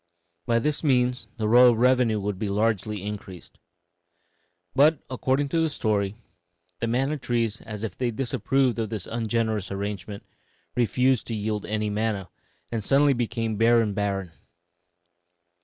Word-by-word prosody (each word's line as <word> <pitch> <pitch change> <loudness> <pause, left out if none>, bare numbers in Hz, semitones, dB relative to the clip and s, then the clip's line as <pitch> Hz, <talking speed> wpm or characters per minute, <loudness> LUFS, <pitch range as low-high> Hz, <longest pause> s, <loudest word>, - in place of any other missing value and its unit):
By 115 - +3
this 150 +6 -1
means 125 -3 +1
the 110 -2 -1
royal 120 +1 +7
revenue 125 -3 +3
would 100 -1 -3
be 105 -2 -2
largely 105 -1 0
increased. 100 -3 -8 1.2
But, 150 +4 +5
according 135 +2 0
to 165 - +1
the 160 - +2
story, 105 -7 -1 0.6
the 115 - -1
manna 135 +6 0
trees, 115 -4 -1
as 110 -1 -7
if 110 - -4
they 125 -2 -1
disapproved 130 +1 0
of 110 -2 -2
this 105 -4 -4
ungenerous 110 -3 -1
arrangement, 100 0 -5 0.5
refused 125 +2 +2
to 115 - -3
yield 105 0 -3
any 105 0 -1
manna, 105 -3 -2 0.4
and 115 -3 -2
suddenly 140 +5 +4
became 115 -2 -2
bare 115 +2 +5
and 110 -3 0
barren. 100 -3 -2
115 Hz, 140 wpm, -25 LUFS, 105-125 Hz, 1.2 s, royal